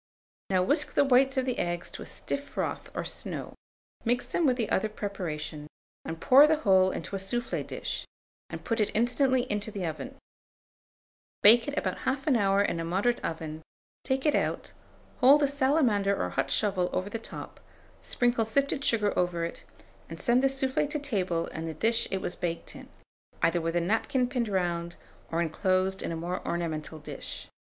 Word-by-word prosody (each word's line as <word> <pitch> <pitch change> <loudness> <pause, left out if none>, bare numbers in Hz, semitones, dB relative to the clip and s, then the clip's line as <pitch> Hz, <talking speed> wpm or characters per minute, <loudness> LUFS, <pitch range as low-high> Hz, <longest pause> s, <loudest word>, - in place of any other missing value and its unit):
Now 185 -1 +3
whisk 290 - +1
the - - +5
whites 270 +1 +4
of 260 - +2
the 255 -2 -2
eggs 175 0 -2
to - - -8
a - - -7
stiff 280 0 -3
froth - - -3
or - - -2
snow; - - -5 0.5
mix 245 +1 +1
them 335 - +1
with 250 -2 +2
the 225 -4 -2
other 215 +3 +1
preparation, 165 -8 -5 0.4
and 165 0 -6
pour 275 - +7
the 315 - +4
whole 190 -10 +4
into 200 - -5
a - - -1
soufflé 240 +5 -2
dish, - - -4 0.4
and - - -7
put 230 0 -1
it 210 - +2
instantly 250 +3 +2
into 210 -1 -3
the 200 -4 -4
oven; 160 -2 -5 1.3
bake 230 +3 +8
it 290 +1 -4
about - - -1
1/2 270 +1 0
hour 200 -2 +3
in 170 -4 -1
a - - -2
moderate 195 +8 0
oven; 160 -1 -4 0.4
take 265 +1 -1
it 300 - +4
out, - - -1 0.5
hold 280 +3 +7
a - - +4
salamander 260 -8 +2
or 90 - -1
hot - - -1
shovel 190 -4 +1
over 185 - -1
the 230 - -3
top, 225 - -9 0.4
sprinkle 240 -2 +1
sifted 275 +5 0
sugar 210 -6 +2
over 175 -2 0
it, 170 - -7 0.5
and - - -8
send 245 0 +3
the - - +6
soufflé 270 +1 0
to 300 - -2
table 185 - -1
in 160 +1 -6
the 160 - -5
dish 225 +8 +1
it 190 - -2
was 175 - -2
baked 170 -1 -4
in, - - -11 0.5
either 170 +1 +3
with 165 +1 -2
a - - +4
napkin 225 +7 +1
pinned 245 -2 -1
round, 170 -3 -1 0.4
or 165 +1 +1
inclosed 185 +3 0
in - - -3
a - - -2
more 175 +3 -4
ornamental 160 -2 -3
dish. 150 - -8
205 Hz, 185 wpm, -28 LUFS, 175-255 Hz, 1.3 s, bake